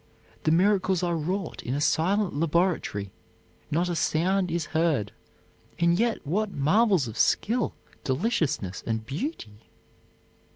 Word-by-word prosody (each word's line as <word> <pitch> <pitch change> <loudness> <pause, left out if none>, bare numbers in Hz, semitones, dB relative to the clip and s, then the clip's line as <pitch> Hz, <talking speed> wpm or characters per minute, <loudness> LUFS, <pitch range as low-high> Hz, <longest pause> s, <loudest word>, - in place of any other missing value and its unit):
The 155 - +4
miracles 185 +1 +3
are 175 -1 +1
wrought 180 +3 -3
in 125 - -3
a - - -1
silent 185 +6 +1
laboratory; 160 - 0 0.6
not 170 +4 +1
a 175 - -1
sound 180 +4 +1
is 165 -1 -1
heard, 155 -11 +1 0.7
and 170 0 +3
yet 230 -6 0
what 205 +8 0
marvels 185 - +3
of 110 0 -7
skill, 230 - +1 0.3
deliciousness 145 - -1
and 110 -1 -2
beauty? 135 - -5
170 Hz, 125 wpm, -26 LUFS, 145-190 Hz, 0.7 s, The